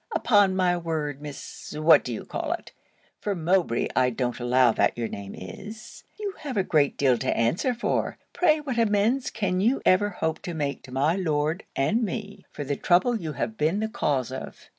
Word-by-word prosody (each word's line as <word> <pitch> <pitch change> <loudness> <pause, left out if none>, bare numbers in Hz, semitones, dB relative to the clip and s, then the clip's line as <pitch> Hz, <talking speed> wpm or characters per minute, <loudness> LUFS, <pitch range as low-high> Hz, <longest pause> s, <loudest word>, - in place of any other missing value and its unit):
Upon 205 -4 +4
my 180 -1 +2
word, 155 -4 -3
Miss 145 -1 -8
What 155 -1 +6
d'ye 120 -3 -5
call - - -2
it, - - -8 0.5
(for 205 -1 -2
Mowbray 170 -7 +1
I 125 - +4
don't 125 0 -2
allow 125 0 +4
that - - +1
your 115 -1 -1
name 100 -2 -7
is) 215 - -10 0.2
you 410 -2 -3
have 280 -7 -5
a 195 - +3
great 150 -6 +2
deal 130 -4 +3
to - - -1
answer 175 - +1
for. 235 - -1 0.2
Pray 315 -4 +3
what 260 -5 -2
amends 225 +4 +2
can 185 -4 -1
you 240 +7 +2
ever 195 +3 +4
hope 160 -4 -2
to 175 - -5
make 140 -3 -2
to 130 - -13
my 140 +6 +2
Lord, 160 -1 -1
and 210 - +1
me, 205 -2 -5
for 145 - -6
the 140 0 -2
trouble 185 - +3
you 155 -2 -4
have 220 +8 -3
been 165 +5 +1
the 220 - 0
cause 135 - -1
of?' 130 - -8
170 Hz, 195 wpm, -26 LUFS, 140-210 Hz, 0.5 s, What